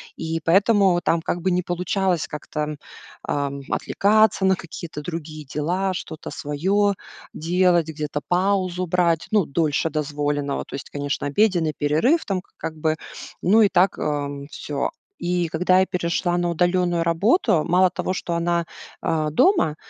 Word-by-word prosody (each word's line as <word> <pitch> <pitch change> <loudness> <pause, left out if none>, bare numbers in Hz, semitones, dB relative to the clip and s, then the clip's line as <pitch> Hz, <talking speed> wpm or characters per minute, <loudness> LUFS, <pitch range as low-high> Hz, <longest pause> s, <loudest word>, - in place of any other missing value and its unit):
И 165 0 -3
поэтому 195 0 +4
там 165 - +2
как 175 +1 -2
бы 185 - +1
не 180 0 +1
получалось 180 0 -1
как-то, 150 0 -5
м, 150 0 -3 0.5
ам, 140 -1 -2
отвлекаться 215 -1 +2
на 190 0 +4
какие-то 170 -3 -8
другие 155 -1 -6
дела, 180 +6 -1
что-то 160 -2 -7
своё 190 +8 0 0.4
делать, 175 0 +2
где-то 150 -1 -4
паузу 185 0 +1
брать, 170 -2 +1
ну, 210 -5 +3
дольше 155 +1 0
дозволенного. 145 -1 -2
То - - -8
есть, 135 - -7
конечно, 145 0 -3
обеденный 170 -1 +2
перерыв 160 - +2
там, 190 -2 -1
к - - -34
как 160 - -5
бы, 155 0 0 0.4
ну 215 +5 +5
и 205 - +4
так, 185 +1 +3
эм, 145 -1 -3
всё. 140 -1 -3 0.3
И 175 -1 0
когда 180 +3 +3
я - - +3
перешла 175 -1 -1
на 175 0 0
удалённую 175 0 +1
работу, 170 - +2
мало 180 +2 +4
того, 180 0 -3
что 170 -2 -3
она, 170 0 +1 0.4
а, 155 -1 0
дома, 330 - +3
170 Hz, 155 wpm, -23 LUFS, 150-185 Hz, 0.5 s, ну